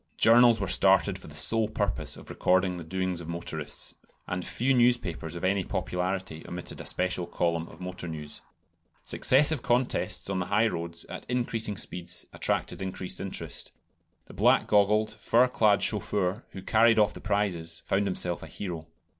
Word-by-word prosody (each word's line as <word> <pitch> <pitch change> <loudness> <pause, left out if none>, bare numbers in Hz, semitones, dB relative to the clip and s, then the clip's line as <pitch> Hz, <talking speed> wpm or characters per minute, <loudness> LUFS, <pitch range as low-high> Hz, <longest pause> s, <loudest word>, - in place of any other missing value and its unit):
Journals 115 0 +6
were - - -2
started - - +3
for - - -12
the - - -12
sole 110 -1 +5
purpose 100 -2 -2
of - - -11
recording 90 0 +1
the 85 - -7
doings 95 +1 -3
of 80 - -9
motorists; 80 -3 -4 0.3
and 90 0 -3
few 130 +8 0
newspapers 120 -10 +1
of 85 - -7
any 95 +1 +1
popularity 90 -3 -3
omitted 90 0 -7
a - - -6
special 90 -1 -1
column 85 -1 -1
of - - -14
motor 90 -1 -6
news. 75 -2 -7 0.6
Successive 145 +1 +3
contests 120 +1 0
on 95 -1 -2
the 90 - -3
highroads 85 -6 -1
at - - -8
increasing 115 -4 -1
speeds 90 -1 -2
attracted - - -1
increased 95 -1 -4
interest. 95 -1 -6 0.5
The - - -14
black - - +3
goggled, 105 +1 +3
fur 115 +4 +3
clad 105 -5 +2
chauffeur 105 0 0
who 95 - -9
carried 115 +2 +4
off 105 -1 +3
the - - -10
prizes 90 -6 -2
found 100 +1 +1
himself 90 -2 -1
a - - -9
hero. 85 -2 -6
95 Hz, 165 wpm, -28 LUFS, 85-110 Hz, 0.6 s, Journals